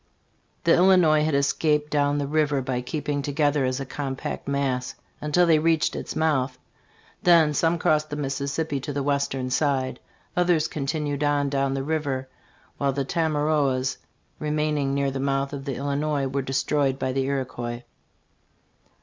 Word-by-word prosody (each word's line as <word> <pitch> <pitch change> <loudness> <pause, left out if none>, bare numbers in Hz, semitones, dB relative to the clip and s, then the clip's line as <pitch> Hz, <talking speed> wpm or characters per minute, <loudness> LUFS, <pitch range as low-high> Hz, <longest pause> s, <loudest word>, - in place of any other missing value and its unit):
"* - - -42
The 170 - +5
Illinois 175 -4 +5
had 155 -2 +1
escaped 150 +1 +1
down 145 -1 +2
the 145 - -1
river 150 -1 +1
by 125 -1 -2
keeping 145 +2 -3
together 145 0 +1
as 130 +1 -1
a 135 - -4
compact 135 0 -5
mass 135 -3 -1 0.3
until 150 +4 +3
they 160 -2 +4
reached 160 0 +2
its - - -5
mouth. 135 -5 +1 0.6
Then 165 -4 +5
some 165 +3 +2
crossed 155 -1 +1
the 145 - -4
Mississippi 140 +1 -2
to 145 +2 -5
the 140 0 -2
western 135 -2 -1
side; 135 -2 0 0.4
others 175 -3 +2
continued 145 0 -2
on 145 -1 +1
down 135 -1 0
the 135 - -2
river, 140 -3 -2 0.5
while 140 -1 +1
the 140 0 -1
Tamaroas, 145 -5 +1 0.4
remaining 150 -2 0
near 140 -1 +1
the 135 - -4
mouth 135 +1 -1
of 140 -1 -6
the 135 -3 -3
Illi 140 +2 -2
nois, 150 -2 0
were 135 +1 -1
destroyed 135 +1 0
by 130 -1 -1
the 135 0 0
Iroquois. 125 -3 -3
140 Hz, 160 wpm, -25 LUFS, 135-150 Hz, 0.6 s, The